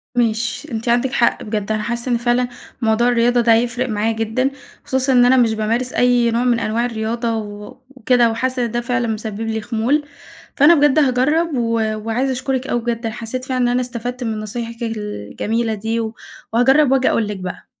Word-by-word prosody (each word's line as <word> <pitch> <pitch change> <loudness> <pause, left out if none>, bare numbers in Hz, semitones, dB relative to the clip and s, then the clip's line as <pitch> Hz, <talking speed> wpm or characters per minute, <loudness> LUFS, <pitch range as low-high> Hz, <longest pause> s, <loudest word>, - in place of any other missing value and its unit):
ماشي. 235 +4 -1
أنتِ 230 +1 -3
عندِك 245 +2 +2
حق 235 - +1
بجد، 210 -1 -3
أنا 215 -1 -1
حاسة 235 +2 -3
إن 235 - +3
فعلًا 240 +1 +1 0.3
موضوع 225 +2 +2
الرياضة 240 0 +3
ده 230 -1 +5
هيفرق 240 +2 0
معايا 215 +1 0
جدًا، 225 +4 -1 0.3
خصوصًا 265 0 +1
إن 245 -1 +6
أنا 260 +1 +5
مش 230 -3 +3
بامارس 230 +4 -1
أي 245 -1 +3
نوع 235 +2 +1
من 240 -2 +2
أنواع 230 +2 0
الرياضة 230 0 -2
و 205 0 -8
وكده، 250 -2 +2
وحاسة 255 +2 -1
إن 230 - -4
ده 240 0 -1
فعلًا 245 0 -1
مسبب 220 -1 -4
لي 225 -1 -2
خمول، 240 +7 0 0.5
فأنا 300 +4 +6
بجد 295 0 +4
هاجرب 295 +5 +2
و 230 -1 0 0.2
وعايزة 225 +5 -1
أشكرِك 260 0 -2
أوي 240 - 0
بجد، 230 0 -3
أنا 225 - -3
حسّيت 245 +2 -5
فعلًا 255 -1 -1
إن - - +3
أنا 245 +1 +1
استفدت 245 +1 -5
من 220 -2 -2
نصايحِك 230 +2 -5
الجميلة 220 - -3
دي 225 +2 -2
و 220 -1 -3 0.4
وهاجرّب 265 +4 +4
وآجي 265 -1 +3
أقول 225 - +1
لِك 205 -1 -4
بقى. 185 -1 -7
235 Hz, 195 wpm, -19 LUFS, 225-250 Hz, 0.5 s, إن